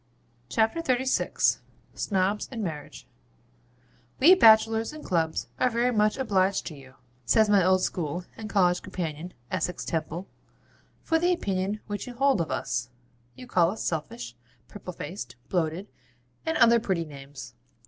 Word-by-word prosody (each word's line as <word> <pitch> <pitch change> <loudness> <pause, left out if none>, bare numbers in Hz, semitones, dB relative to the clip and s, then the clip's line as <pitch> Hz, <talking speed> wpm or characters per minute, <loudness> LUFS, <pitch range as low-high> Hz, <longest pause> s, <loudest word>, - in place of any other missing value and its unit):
CHAPTER 225 +9 +1
XXXVI 260 -3 +1 0.3
SNOBS 195 +1 -1
AND 230 -4 -4
MARRIAGE 150 -5 -7 1.1
'We 330 +8 +8
Bachelors 225 -5 +5
in 310 - -9
Clubs 160 -3 0
are 255 - +3
very 240 +1 +1
much 210 +2 +2
obliged 195 -7 +1
to 160 - -6
you,' 135 -1 -15 0.3
says 220 - +4
my 200 -3 +5
old 185 +1 +3
school 175 +1 -2
and 220 -1 -7
college 180 -4 +2
companion, 175 -2 -5 0.2
Essex 180 - -2
Temple, 165 +3 -3 0.8
'for 325 0 +2
the 350 +2 +2
opinion 200 - -1
which 205 +4 -5
you 245 - -8
hold 270 -6 +3
of 160 - -3
us. 125 -2 -2 0.5
You 250 - -10
call 175 -8 +3
us 215 - -5
selfish, 120 -7 -4 0.3
purple 205 -3 -8
faced, 150 - -7
bloated, 175 +2 -1 0.6
and 320 - +1
other 235 0 +6
pretty 185 -6 -1
names. 140 -2 -10
190 Hz, 145 wpm, -27 LUFS, 165-225 Hz, 1.1 s, We